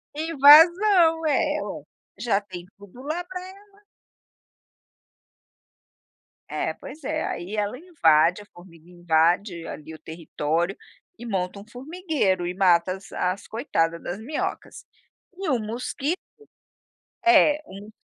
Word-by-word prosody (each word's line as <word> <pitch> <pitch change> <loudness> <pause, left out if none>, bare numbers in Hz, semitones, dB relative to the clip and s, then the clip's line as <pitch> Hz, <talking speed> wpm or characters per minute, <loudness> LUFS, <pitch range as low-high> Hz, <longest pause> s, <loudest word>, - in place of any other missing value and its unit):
Invasão, 325 +3 +6
é! 305 - +1
Olha, - - -7 0.3
já 225 -5 +1
tem 185 -4 -10
tudo 205 +5 -14
lá 315 +5 -3
pra 365 0 -7
ela. 400 +2 -16 2.7
É, - - -2
pois 310 - -12
é. - - -2
Aí 180 +5 -5
ela 210 +3 -2
invade 180 - +2
a - - -14
formiga 175 -2 -17
invade 175 +1 0
ali 155 +1 -9
o 155 - -11
território 165 +2 -3 0.4
e 240 - -9
monta 190 -3 -3
um 200 - -14
formigueiro 260 - -2
e 180 - -3
mata 180 -1 +3
as 190 +1 -12
as 185 +2 -3
coitada 170 - -1
das 175 +4 -6
minhocas. 280 +8 -5 0.5
E 380 -2 -4
o 260 -4 +1
mosquito 250 +9 -3 1.1
é 310 -3 +5
um 200 +2 -11
210 Hz, 125 wpm, -24 LUFS, -, 2.7 s, Invasão